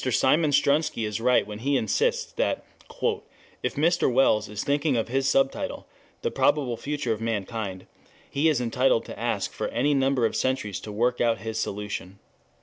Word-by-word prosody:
Simeon 140 +5 +3
Strunsky 145 -3 +2
is 105 +1 -3
right 125 +1 +3
when 105 0 -7
he 140 +4 +1
insists 475 - 0
that - - -1 1.0
"if - - -2
Mr. 165 -1 +2
Wells 115 -5 +3
is 105 0 -4
thinking 145 -1 +1
of 115 - -1
his 135 +2 +1
subtitle, 135 0 0 0.4
The - - 0
Probable 135 -6 +2
Future 140 -2 -2
of 110 - -7
Mankind, 105 -3 -3 0.4
he 145 +3 +2
is 150 -5 +2
entitled 125 0 +2
to - - -9
ask - - -1
for - - -3
any 140 +5 +1
number 135 -3 +2
of 110 - -1
centuries 130 -7 -1
to 105 - -8
work 120 +4 0
out 115 -1 +2
his 110 0 -4
solution. 100 -2 -4
125 Hz, 170 wpm, -26 LUFS, 110-140 Hz, 1.0 s, Simeon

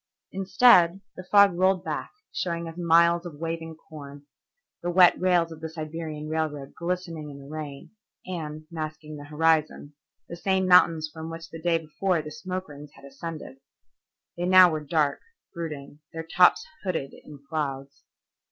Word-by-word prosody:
Instead, 190 -2 +4
the 185 - -8
fog 200 +1 +5
rolled 185 +1 +2
back - - -4 0.2
showing 170 -1 -3
us 165 - -8
miles 170 0 +4
of 175 -4 -8
waving 165 +1 -5
corn, 145 -3 -12 0.6
the 175 - -2
wet 175 0 +6
rails 175 -2 +2
of 160 -1 -10
the 160 - -5
Siberian 155 -1 -6
Railroad 155 -3 -3
glistening 170 -3 -4
in 140 - -10
the 140 0 -12
rain, 150 -2 -8 0.3
and, 155 -4 -6
masking 155 -1 -6
the 145 - -10
horizon, 155 -1 0 0.3
the 170 - -7
same 190 +2 0
mountains 170 -3 +5
from 160 0 -7
which 165 0 -9
the 165 - -9
day 170 0 +2
before 165 +3 -1
the 150 - -8
smoke 185 +4 -5
rings 145 0 -11
had - - -15
ascended. 140 0 -8 0.8
They 175 - -2
now 185 -1 +8
were 155 -1 -3
dark, 150 -1 0 0.3
brooding, 150 -4 -7
their 165 0 -5
tops 180 +2 +4 0.2
hooded 170 -8 -3
in 150 - -13
clouds. 140 -2 -4
165 Hz, 160 wpm, -26 LUFS, 150-175 Hz, 0.8 s, now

